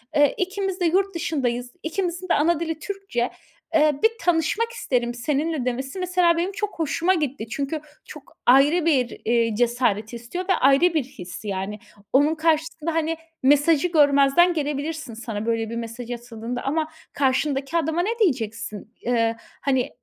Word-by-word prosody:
Eee, 290 Hz, -1 st, +5 dB
ikimiz 385 Hz, 0 st, -2 dB
de 355 Hz, -, +1 dB
yurt 380 Hz, +3 st, +2 dB
dışındayız. 250 Hz, -7 st, -2 dB
İkimizin 350 Hz, +2 st, -2 dB
de -, -, +4 dB
ana 320 Hz, +2 st, +3 dB
dili 325 Hz, -2 st, -3 dB
Türkçe. 390 Hz, -, -3 dB, 0.4 s
Eee, 305 Hz, -1 st, +5 dB
bir 445 Hz, -, +6 dB
tanışmak 355 Hz, +7 st, +1 dB
isterim 245 Hz, -, -1 dB
seninle." 285 Hz, +3 st, -1 dB
demesi 265 Hz, +7 st, -3 dB
mesela 360 Hz, -2 st, +2 dB
benim 355 Hz, +3 st, 0 dB
çok 405 Hz, -2 st, -4 dB
hoşuma 330 Hz, +4 st, +1 dB
gitti. 285 Hz, -9 st, -2 dB
Çünkü 280 Hz, +6 st, -3 dB, 0.2 s
çok 300 Hz, -3 st, -13 dB
ayrı 290 Hz, +7 st, +5 dB
bir, 260 Hz, -7 st, +1 dB
eee, 230 Hz, -1 st, +2 dB
cesaret 235 Hz, -2 st, +1 dB
istiyor 240 Hz, +11 st, -5 dB
ve -, -, +6 dB
ayrı 275 Hz, +6 st, +4 dB
bir 310 Hz, -4 st, +1 dB
his, 185 Hz, -6 st, -10 dB
yani. 200 Hz, +1 st, -3 dB, 0.3 s
Onun 290 Hz, +4 st, +4 dB
karşısında, 320 Hz, 0 st, 0 dB
hani, 325 Hz, 0 st, 0 dB, 0.3 s
mesajı 290 Hz, +4 st, +4 dB
görmezden 290 Hz, +2 st, +5 dB
gelebilirsin 295 Hz, -2 st, -3 dB
sana 220 Hz, -2 st, -5 dB
böyle 225 Hz, -1 st, 0 dB
bir 230 Hz, -, -5 dB
mesaj 235 Hz, +1 st, -6 dB
atıldığında 240 Hz, 0 st, -5 dB
ama 310 Hz, +3 st, 0 dB, 0.3 s
karşındaki 275 Hz, +2 st, 0 dB
adama 320 Hz, +1 st, 0 dB
ne 455 Hz, +6 st, -2 dB
diyeceksin? 225 Hz, -, -1 dB
Eee, 230 Hz, -1 st, +1 dB, 0.3 s
hani, 260 Hz, -3 st, +1 dB
290 Hz, 155 wpm, -23 LUFS, 240-335 Hz, 0.4 s, bir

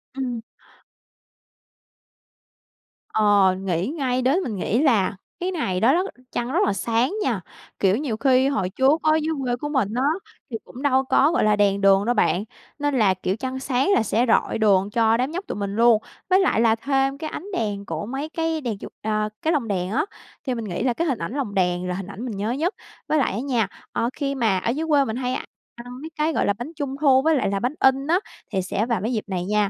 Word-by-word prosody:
Ừm. 250 Hz, -4 st, -3 dB, 2.7 s
Ờ, 205 Hz, -3 st, +4 dB
nghĩ 180 Hz, 0 st, -1 dB
ngay 265 Hz, -4 st, -1 dB
đến, 270 Hz, +8 st, +3 dB
mình 220 Hz, -5 st, -3 dB
nghĩ 210 Hz, +5 st, 0 dB
là 225 Hz, -10 st, +3 dB, 0.2 s
cái 365 Hz, +1 st, -1 dB
ngày 195 Hz, -, -1 dB
đó 240 Hz, +8 st, +4 dB
đó 360 Hz, -, +2 dB, 0.3 s
trăng 240 Hz, +1 st, -2 dB
rất -, -, +2 dB
là 205 Hz, -, +1 dB
sáng 230 Hz, -, 0 dB
nha, 225 Hz, -7 st, 0 dB, 0.4 s
kiểu, 195 Hz, +1 st, +3 dB
nhiều 255 Hz, -6 st, -2 dB
khi 260 Hz, +1 st, +3 dB
hồi 195 Hz, -10 st, 0 dB
trước 265 Hz, -, +3 dB
á 310 Hz, -, +4 dB
dưới 320 Hz, +1 st, -1 dB
quê 245 Hz, -1 st, 0 dB
của 295 Hz, +4 st, -5 dB
mình 250 Hz, -8 st, 0 dB
á, 250 Hz, -, 0 dB, 0.5 s
thì 225 Hz, -, -2 dB
cũng 255 Hz, -, -11 dB
đâu 265 Hz, -2 st, +3 dB
có, 275 Hz, +3 st, +3 dB
gọi 340 Hz, -, +2 dB
là, 210 Hz, 0 st, +4 dB
đèn 200 Hz, -1 st, +2 dB
đường 195 Hz, +1 st, +5 dB
đâu 245 Hz, -, +2 dB
bạn, 185 Hz, -2 st, +2 dB, 0.4 s
nên 290 Hz, -1 st, 0 dB
là, 195 Hz, -3 st, +4 dB
kiểu, 185 Hz, +1 st, -2 dB
trăng 260 Hz, +3 st, -4 dB
sáng 265 Hz, +6 st, +1 dB
là -, -, +3 dB
sẽ 225 Hz, +3 st, +1 dB
rọi 225 Hz, -, +2 dB
đường 200 Hz, -3 st, +3 dB
cho 225 Hz, +1 st, +3 dB
đám 260 Hz, +4 st, -1 dB
nhóc 365 Hz, +4 st, -4 dB
tụi -, -, -4 dB
mình 200 Hz, -1 st, -3 dB
luôn. 230 Hz, -1 st, +5 dB, 0.3 s
Với 375 Hz, +1 st, +5 dB
lại 380 Hz, -, +2 dB
là 225 Hz, -1 st, +4 dB
thêm 270 Hz, +3 st, 0 dB
cái 310 Hz, 0 st, -5 dB
ánh 335 Hz, -, -7 dB
đèn 205 Hz, -, -2 dB
của 165 Hz, +1 st, -4 dB
mấy 270 Hz, +6 st, -4 dB
cái 325 Hz, -1 st, -2 dB
đèn 230 Hz, -5 st, -3 dB
chuột -, -, -9 dB
ờ, 215 Hz, 0 st, 0 dB
cái 320 Hz, -, +1 dB
lồng 270 Hz, -7 st, 0 dB
đèn 185 Hz, -2 st, -2 dB
á, 295 Hz, -, +1 dB, 0.4 s
thì 255 Hz, -, 0 dB
mình 230 Hz, -, -4 dB
nghĩ 185 Hz, 0 st, -3 dB
là 250 Hz, -2 st, +2 dB
cái 335 Hz, +7 st, -1 dB
hình 265 Hz, -6 st, -1 dB
ảnh 170 Hz, +7 st, -4 dB
lồng 265 Hz, -8 st, -3 dB
đèn 180 Hz, -1 st, +1 dB
là 180 Hz, -, -1 dB
hình 190 Hz, 0 st, -5 dB
ảnh 200 Hz, +4 st, -7 dB
mình 220 Hz, -6 st, -5 dB
nhớ 210 Hz, +3 st, -1 dB
nhất. 315 Hz, +8 st, 0 dB, 0.3 s
Với 310 Hz, -, +2 dB
lại 275 Hz, -, +2 dB
á 205 Hz, -, -2 dB
nha, 240 Hz, -6 st, 0 dB, 0.2 s
ờ, 230 Hz, -, 0 dB
khi 275 Hz, -1 st, -2 dB
mà 225 Hz, -7 st, +2 dB
ở 205 Hz, -, -2 dB
dưới 305 Hz, +6 st, -2 dB
quê 285 Hz, -2 st, +4 dB
mình 220 Hz, -, -3 dB
hay 250 Hz, 0 st, -2 dB, 0.4 s
ăn 245 Hz, +2 st, -10 dB
mấy 315 Hz, -, -6 dB
cái, 310 Hz, +1 st, 0 dB
gọi -, -, +1 dB
là, 200 Hz, -, +2 dB
bánh 240 Hz, +9 st, -7 dB
Trung 285 Hz, -3 st, -3 dB
thu 265 Hz, -3 st, +5 dB
với 320 Hz, +2 st, +3 dB
lại 260 Hz, -8 st, +1 dB
là 200 Hz, -, -1 dB
bánh 250 Hz, +7 st, -2 dB
in 265 Hz, +1 st, +3 dB
á, 345 Hz, +3 st, +3 dB, 0.3 s
thì 190 Hz, -3 st, 0 dB
sẽ 195 Hz, +4 st, -1 dB
vào 235 Hz, -5 st, -1 dB
mấy 225 Hz, +5 st, -1 dB
dịp 220 Hz, -, -1 dB
này 180 Hz, -3 st, -3 dB
nha, 210 Hz, 0 st, +1 dB
240 Hz, 240 wpm, -23 LUFS, 205-275 Hz, 2.7 s, đường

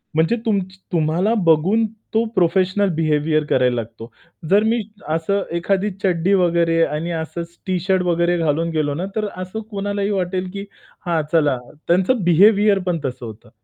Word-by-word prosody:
म्हणजे 160 Hz, +8 st, +2 dB
तुमची 190 Hz, -3 st, -1 dB
तुम्हाला 170 Hz, +5 st, +1 dB
बघून 180 Hz, +8 st, +3 dB, 0.3 s
तो 225 Hz, -, +3 dB
प्रोफेशनल 185 Hz, +2 st, +2 dB
बिहेवियर 155 Hz, -1 st, +1 dB
करायला 125 Hz, -3 st, +2 dB
लागतो. 115 Hz, 0 st, -7 dB, 0.4 s
जर 205 Hz, +2 st, +4 dB
मी 230 Hz, +1 st, +1 dB, 0.3 s
असं 200 Hz, +5 st, 0 dB, 0.2 s
एखादी 195 Hz, +4 st, 0 dB
चड्डी 185 Hz, 0 st, +1 dB
वगैरे 170 Hz, -3 st, +2 dB
आणि 155 Hz, +4 st, -3 dB
असचं 165 Hz, +1 st, -4 dB, 0.2 s
टी-शर्ट 185 Hz, 0 st, +1 dB
वगैरे 175 Hz, 0 st, +1 dB
घालून 165 Hz, 0 st, 0 dB
गेलो 145 Hz, -2 st, 0 dB
ना, 170 Hz, +6 st, -3 dB
तर 215 Hz, -1 st, -1 dB
असं 185 Hz, +4 st, -6 dB
कोणालाही 200 Hz, 0 st, -2 dB
वाटेल 185 Hz, -2 st, -2 dB
की 200 Hz, 0 st, -5 dB, 0.4 s
"हां, 170 Hz, -2 st, +1 dB
चला," 150 Hz, -5 st, +2 dB, 0.3 s
त्यांचं 190 Hz, +6 st, +2 dB
बिहेवियर 200 Hz, +4 st, +5 dB
पण 175 Hz, -2 st, 0 dB
तसं 125 Hz, -2 st, -5 dB
होतं. 110 Hz, -1 st, -11 dB
175 Hz, 150 wpm, -20 LUFS, 160-195 Hz, 0.4 s, बिहेवियर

